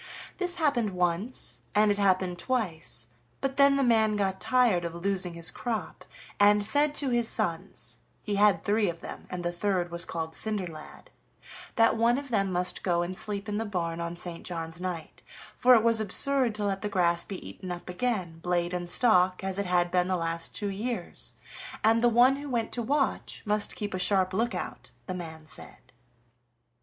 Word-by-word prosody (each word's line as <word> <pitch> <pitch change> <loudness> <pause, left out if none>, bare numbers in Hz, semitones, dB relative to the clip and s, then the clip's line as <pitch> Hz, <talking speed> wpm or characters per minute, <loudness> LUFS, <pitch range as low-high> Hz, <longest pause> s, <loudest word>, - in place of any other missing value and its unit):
This 355 -2 +1
happened 280 -10 +1
once, 180 +7 -1
and 210 0 +5
it 205 - -1
happened 185 -2 +1
twice, 175 - -2 0.3
but 270 0 -2
then 280 0 +6
the 275 - +2
man 220 -3 +3
got 190 -2 -1
tired 245 -9 +3
of 170 0 -4
losing 180 -1 -2
his 170 +1 +2
crop, 230 -3 -4 0.3
and 205 0 +5
said 290 +7 +2
to 275 -4 +1
his 240 -1 +2
sons 165 -6 -3 0.2
he 210 - -3
had 205 0 +4
three 205 -1 +2
of 170 0 -7
them, - - -8
and 180 -1 -5
the 175 - 0
third 175 -1 -1
was 170 0 +2
called 160 -1 -4
Cinderlad 180 -8 -2 0.6
that 225 0 +4
one 235 +2 +3
of 280 -1 -6
them 195 -5 +1
must 180 0 0
go 175 -2 +1
and 180 +2 -5
sleep 205 0 -2
in 210 0 -2
the - - 0
barn 170 -5 -3
on 170 +1 -4
St. 175 -1 -2
John's 165 -1 -6
night, 180 -3 -5 0.3
for 250 0 +6
it 225 - +4
was 230 -1 +3
absurd 250 +3 +1
to 210 -1 -2
let 195 -1 -1
the 210 - -2
grass 170 -3 +2
be 195 - -8
eaten 185 -2 -8
up 175 0 -7
again, 180 -4 -2
blade 175 0 -1
and 175 -1 -2
stalk, 185 -4 +4
as 190 0 -2
it 200 - -1
had 175 -1 +2
been 180 0 +2
the 185 -1 0
last 165 0 -2
two 205 -2 -2
years, 230 +5 -4 0.5
and 225 +2 +4
the 240 - +6
one 245 +4 +5
who 285 0 -7
went 235 -3 -1
to 240 - -2
watch 275 +4 -1
must 210 0 +2
keep 205 -2 -4
a 185 - -2
sharp 185 0 +2
look 230 +5 0
out, - - -6 0.2
the 185 - -4
man 160 -3 -7
said. 125 -4 -6
195 Hz, 195 wpm, -28 LUFS, 175-230 Hz, 0.6 s, then